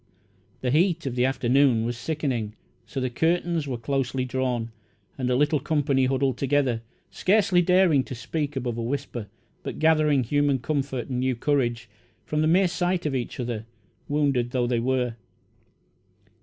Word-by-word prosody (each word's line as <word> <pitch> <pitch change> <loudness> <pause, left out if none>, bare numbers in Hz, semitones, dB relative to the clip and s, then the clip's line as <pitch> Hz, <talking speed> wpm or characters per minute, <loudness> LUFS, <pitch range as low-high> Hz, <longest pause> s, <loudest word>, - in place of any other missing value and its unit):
The 125 - 0
heat 170 +2 +2
of 135 - -2
the 125 0 +2
afternoon 130 -2 +3
was 120 +1 -2
sickening, 120 -5 -2 0.3
so 135 - -4
the 130 -1 -1
curtains 165 +2 0
were 130 -3 -3
closely 130 +1 -1
drawn, 125 -3 -2 0.4
and 130 -2 -2
the 125 - +2
little 145 +3 +2
company 140 -2 +1
huddled 135 -1 0
together, 135 -4 +1 0.3
scarcely 190 -2 +3
daring 180 -5 +4
to 130 - -6
speak 145 +4 -3
above 120 -3 -3
a - - -1
whisper, 120 -3 -4 0.3
but - - -6
gathering 155 -4 +3
human 145 +2 +2
comfort 135 -1 -2
and 125 -2 -2
new 130 0 +1
courage 120 -3 0 0.4
from 150 0 -1
the 155 - +3
mere 185 +4 +4
sight 180 0 -1
of 150 - 0
each 125 -1 -3
other, 115 -3 -4 0.4
wounded 140 -5 +1
though 125 -1 0
they 120 -1 +1
were. 125 -1 0
135 Hz, 160 wpm, -25 LUFS, 125-150 Hz, 0.4 s, daring